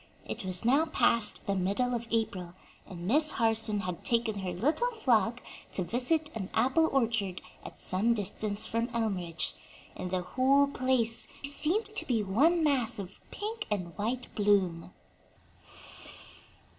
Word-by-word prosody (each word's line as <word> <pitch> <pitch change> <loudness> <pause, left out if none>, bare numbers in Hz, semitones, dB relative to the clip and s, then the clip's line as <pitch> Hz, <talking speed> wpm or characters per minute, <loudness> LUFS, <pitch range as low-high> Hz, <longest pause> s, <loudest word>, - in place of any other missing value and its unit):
It - - -5
was 185 +2 +1
now 280 +7 +4
past 230 -8 +3
the 200 - 0
middle 200 +7 0
of 235 -1 -3
April, 195 -6 -2 0.3
and 175 -2 -8
Miss 300 +7 +3
Harson 225 -2 +1
had 180 -2 -5
taken 230 -3 0
her 185 -2 -3
little 300 - +1
flock 240 - +1 0.3
to 185 - -1
visit 295 - 0
an 195 -4 -4
apple 320 +6 +3
orchard 225 -8 0 0.2
at - - -10
some 215 +6 0
distance 205 0 -1
from 230 +1 -1
Elmridge, 185 -7 -1 0.4
and 180 - -5
the 180 0 -1
whole 265 +8 +3
place 255 -4 0 0.2
seemed 315 +9 +1
to - - -2
be 230 -4 +1
one 300 - +3
mass 270 -7 +2
of 195 -2 -8
pink 435 +1 -5
and 180 -6 -3
white 240 +6 -3
bloom. 195 -5 +1
225 Hz, 145 wpm, -30 LUFS, 195-260 Hz, 0.4 s, now